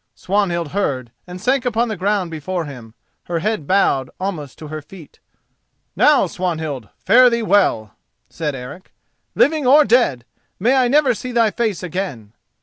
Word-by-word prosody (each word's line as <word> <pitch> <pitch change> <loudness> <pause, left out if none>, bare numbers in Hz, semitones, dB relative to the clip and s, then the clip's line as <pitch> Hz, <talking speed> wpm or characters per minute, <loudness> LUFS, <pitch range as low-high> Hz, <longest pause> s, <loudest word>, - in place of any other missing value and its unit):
Swanhild 180 -5 -1
heard 135 - -2 0.2
and 180 0 -8
sank 255 +6 +1
upon 240 -1 0
the 220 - -3
ground 190 -1 -1
before 165 +2 -4
him, 120 -6 -11 0.3
her 175 - -2
head 210 -3 -2
bowed 140 -9 +2
almost 175 -8 -5
to 155 - -10
her 155 0 -6
feet. 160 +1 -15 0.8
"Now, 295 -7 +4
Swanhild, 160 - -4
fare 250 +1 +5
thee 235 -1 -1
well," 190 - +2 0.3
said 150 -4 -4
Eric. 135 +9 -10 0.4
"Living 300 -2 +2
or 290 +3 +6
dead, 215 - +2 0.3
may 235 +7 +2
I 260 -2 +3
never 275 0 +3
see 250 +3 -6
thy 230 -3 +2
face 215 -3 -2
again!" 160 - -5
185 Hz, 155 wpm, -19 LUFS, 150-235 Hz, 0.8 s, or